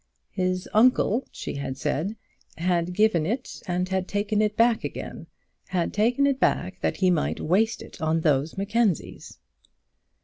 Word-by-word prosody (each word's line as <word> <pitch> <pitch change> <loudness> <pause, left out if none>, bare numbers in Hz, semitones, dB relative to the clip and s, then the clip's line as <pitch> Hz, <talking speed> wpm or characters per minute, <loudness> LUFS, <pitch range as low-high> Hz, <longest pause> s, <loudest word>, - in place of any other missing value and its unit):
"His 185 -1 -1
uncle," 240 +1 +3
she - - -6
had 135 -1 -4
said, 180 +11 -2 0.4
"had 175 0 0
given 180 -5 +3
it, 245 +6 -4
and 180 0 0
had 190 0 -1
taken 205 +1 0
it 215 0 0
back 230 -1 +3
again, - - -6 0.4
had 175 -2 -1
taken 240 +6 +2
it 275 -2 +1
back 185 -5 0
that - - 0
he 185 -1 +3
might 165 - 0
waste 210 +7 +1
it - - -13
on 160 +1 +1
those 150 +1 +1
Mackenzies." 205 -1 -1
190 Hz, 150 wpm, -25 LUFS, 175-220 Hz, 0.4 s, uncle